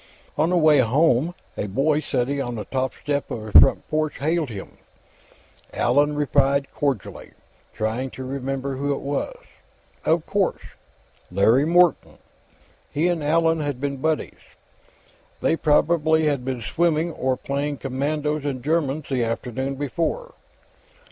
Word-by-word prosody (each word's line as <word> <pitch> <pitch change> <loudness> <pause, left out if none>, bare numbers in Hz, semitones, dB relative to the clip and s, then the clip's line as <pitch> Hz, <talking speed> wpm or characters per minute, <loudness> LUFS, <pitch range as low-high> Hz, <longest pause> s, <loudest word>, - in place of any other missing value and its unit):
On 155 +3 +2
the 180 - +2
way 155 -3 +5
home, 140 +5 +2 0.2
a - - -3
boy, 140 +9 +1
sitting 140 -1 -1
on 120 -2 -4
the 105 - -5
top 130 0 -2
step 145 -1 -3
of 110 -2 -5
a 110 - -7
front - - +6
porch, 155 0 -1
hailed 160 0 0
him. 100 -4 -9 1.0
Allan 145 +4 +2
replied 140 -1 +1
cordially, 135 -9 -3 0.4
trying 115 +5 -2
to 130 - -8
remember 135 +1 -3
who 140 +1 0
it - - -7
was. 145 - -3 0.7
Of 160 0 +1
course; 200 -3 0 0.7
Larry 110 +9 +4
Morton! 175 +1 +3 0.7
He 160 +5 +1
and 170 -3 -1
Allan 165 +2 +2
had 145 -4 -3
been 140 0 -2
buddies. 155 +3 -2 1.0
They - - +2
probably 160 0 +2
had 140 -4 0
been 130 -2 -3
swimming, 165 +6 +1
or 130 -4 -1
playing 140 +2 -3
Commandos 145 +3 -2
and 135 -4 -3
Germans, 155 -1 0
the 130 -3 0
afternoon 125 +4 -3
before. 165 - -3
145 Hz, 140 wpm, -23 LUFS, 130-155 Hz, 1.0 s, front